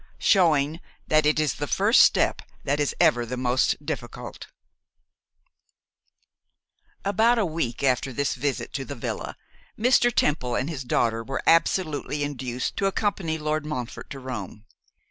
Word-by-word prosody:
Showing 160 -5 +3 0.3
That 155 -1 +3
It 155 - +2
Is 150 -5 +1
the - - -4
First - - +4
Step - - +3 0.2
That 145 +1 0
Is 145 - 0
Ever 155 -8 +4
the 125 +2 -5
Most 125 +1 +1
Difficult. - - -6 2.6
ABOUT 220 +5 +3
a 220 - +2
week 155 -8 -3
after 130 0 +1
this 140 +3 -1
visit 140 -3 -3
to - - -3
the - - -7
villa, - - -5 0.4
Mr. 240 +1 +4
Temple 135 - 0
and 135 +6 -1
his 140 -4 -5
daughter 115 -2 0
were 135 +3 -4
absolutely 155 -3 +1
induced 130 -3 -3
to 195 - +1
accompany 195 -5 -1
Lord 155 0 -2
Montfort 130 -6 -6
to 140 - -7
Rome. 110 -5 -7
145 Hz, 145 wpm, -25 LUFS, 125-165 Hz, 2.6 s, First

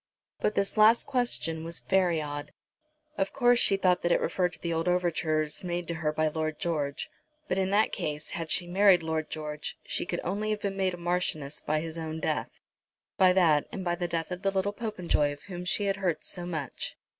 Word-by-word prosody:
But 210 - 0
this 200 +2 0
last 220 +2 +6
question 245 - 0
was 165 0 -4
very 180 -4 +2
odd. 145 -1 -5 0.7
Of 195 - 0
course 245 -2 +4
she 195 - +4
thought 185 -2 +2
that 175 - +1
it - - +4
referred 180 -1 0
to - - -7
the 170 -1 -2
old 165 +2 -1
overtures 160 -4 +1
made 175 -1 -3
to - - 0
her 160 -2 -1
by 155 +1 +1
Lord 155 0 -2
George; 150 -4 -2 0.4
but 185 - 0
in 190 0 +1
that 210 +2 +3
case, 150 0 -4
had 165 -3 -4
she 175 - +2
married 185 -1 +5
Lord 160 -1 -2
George, 150 -1 -5
she - - -2
could 175 - -2
only 205 +4 -2
have 215 -1 -1
been 200 -1 -2
made 190 -2 0
a - - -12
marchioness 170 -5 -2
by 155 +1 0
his 165 0 -6
own 160 0 -4
death, - - -1 0.7
by 185 -1 +7
that 165 -6 +4
and 190 - -5
by 175 - +1
the 175 0 -2
death 165 0 -3
of 180 0 -4
the 195 - +2
little 195 +1 0
Popenjoy 180 -9 0
of 145 +1 -14
whom 180 -1 -7
she 205 +3 +1
had 195 0 0
heard 185 -5 -1
so 175 -1 0
much. 155 -7 -4
175 Hz, 215 wpm, -29 LUFS, 155-190 Hz, 0.7 s, by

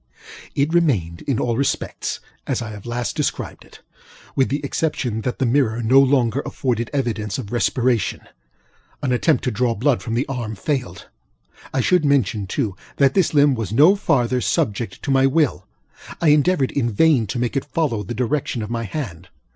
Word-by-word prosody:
It 145 +3 +1
remained 110 - +1
in 135 -5 +1
all 120 -1 0
respects 140 +3 -2 0.3
as - - 0
I 110 - -6
have 105 +1 -10
last 120 -1 -3
described - - -3
it, - - -17 0.5
with 135 - +2
the 145 - -1
exception 130 -7 -1
that 125 +2 -3
the 135 - 0
mirror 120 -2 +1
no 130 +5 +6
longer 135 -1 +2
afforded 120 -3 -2
evidence 110 -7 -2
of 115 -5 -6
respiration. 120 -3 0 0.8
An 130 - 0
attempt 130 +3 +2
to 125 - 0
draw 115 +1 0
blood 125 +3 +1
from 115 -1 -3
the 125 - +1
arm 120 -5 -4
failed. 115 - -3 0.7
I 135 - 0
should 180 +4 +3
mention, 120 -8 +1
too, 105 -2 -2 0.2
that 135 -1 +3
this 185 -5 +2
limb 145 -1 +5
was 115 -6 -3
no 155 - +6
farther 125 - +1
subject 110 +1 -1
to 140 - -1
my 135 0 +4
will. 135 - +1 0.5
I 165 - +3
endeavored 150 -1 +3
in 120 -4 0
vain 125 0 +3
to 125 - -4
make 120 +2 -1
it 135 - 0
follow 140 -6 -1
the 105 +4 -6
direction 125 -1 -1
of 105 - -6
my 115 -1 -2
hand. 95 - -6
125 Hz, 180 wpm, -21 LUFS, 115-140 Hz, 0.8 s, no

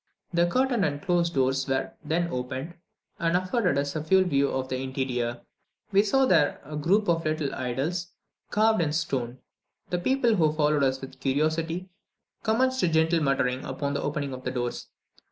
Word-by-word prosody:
The 170 0 +3
curtained 250 +2 +1
and 145 -4 0
closed 170 0 0
doors 135 0 +1
were 135 0 -1
then 165 +3 0
opened, 130 +5 -4 0.5
and 170 +1 +2
afforded 185 - 0
us 140 +1 -1
a 155 - -2
full 190 +4 +4
view 140 -6 +2
of 130 0 -2
the 130 - -2
interior. 130 -3 -2 0.5
We 195 - +5
saw 265 +6 +3
there 145 - +3
a 150 +2 -10
little 175 +8 +3
group - - -11
of 165 -1 +2 0.3
idols 140 +8 -2 0.4
carved 220 -1 +3
in 150 -2 0
stone. 130 -6 -2 0.5
The 180 - 0
people 240 +2 +2
who 155 -3 +3
followed 150 -1 +2
us 130 -1 +1
with 135 - -10
curiosity 160 +6 -1 0.5
commenced 260 +4 +1
a - - +3
gentle 160 +1 +2
muttering 135 -2 +1
upon 140 +2 -3
the 140 - -1
opening 145 -2 -2
of 130 0 -8
the 125 - -2
doors. 120 -1 -3
155 Hz, 175 wpm, -27 LUFS, 135-180 Hz, 0.5 s, We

